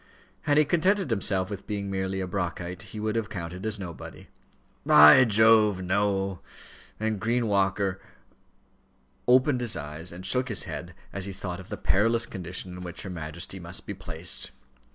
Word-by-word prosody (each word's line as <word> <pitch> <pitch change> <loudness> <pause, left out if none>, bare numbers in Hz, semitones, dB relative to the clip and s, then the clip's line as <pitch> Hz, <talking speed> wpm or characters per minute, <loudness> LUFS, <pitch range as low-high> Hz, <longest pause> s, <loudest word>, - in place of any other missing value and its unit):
Had 145 - +4
he 150 - +5
contented 185 - +1
himself 95 -3 +1
with 100 - -7
being 100 -2 -3
merely 95 0 -2
a 95 - -3
Brockite, 90 0 -4
he 105 - -7
would 110 +1 -2
have 115 -2 -1
counted 90 +2 -5
as 110 -1 -1
nobody. 85 -4 -9 0.5
"By 75 +11 +8
Jove! 110 -3 +4
no," 95 0 0 0.6
and 110 -1 -1
Green 115 +4 0
Walker 95 -1 0 1.3
opened 130 +1 +4
his 120 -3 0
eyes 75 +4 -6
and 90 +2 -9
shook 130 0 +2
his 110 - +2
head, - - -7 0.2
as 100 -1 -1
he 100 - -5
thought 90 -1 -6
of 95 - -12
the - - -5
perilous 115 +4 +2
condition 90 0 -6
in 90 - -8
which 90 -1 -6
her 95 - -6
Majesty 85 +3 -6
must 85 +1 -3
be 100 - -5
placed. 90 -3 -3
95 Hz, 170 wpm, -27 LUFS, 90-110 Hz, 1.3 s, By